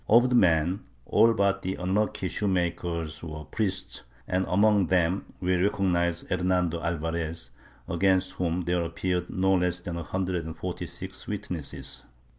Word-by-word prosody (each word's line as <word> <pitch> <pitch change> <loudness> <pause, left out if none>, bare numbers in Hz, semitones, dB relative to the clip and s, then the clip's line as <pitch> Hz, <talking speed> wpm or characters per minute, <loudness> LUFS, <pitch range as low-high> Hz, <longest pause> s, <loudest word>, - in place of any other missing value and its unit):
Of 120 +3 +6
the 125 - +2
men, 85 -2 +4 0.3
all 115 - +5
but 100 -1 +2
the 95 0 -2
unlucky 95 +1 0
shoe 105 +3 -2
maker 85 -2 0 0.2
were 75 -2 -6
priests, 100 -4 -2 0.2
and 95 +1 0
among 100 0 +4
them 90 +1 +2
we 90 0 +1
recognize 90 -3 +1
Hernando 90 -2 0
Alvarez, 80 -4 -2 0.4
against 95 +1 +2
whom 90 -1 -1
there 90 0 0
appeared 90 +1 -2
no 95 +1 +2
less 90 -1 +2
than 85 -1 -5
a 85 - -4
hundred 90 0 -2
and 80 - -7
forty - - -4
six - - -8
witnesses. - - -4
90 Hz, 150 wpm, -27 LUFS, 85-95 Hz, 0.4 s, Of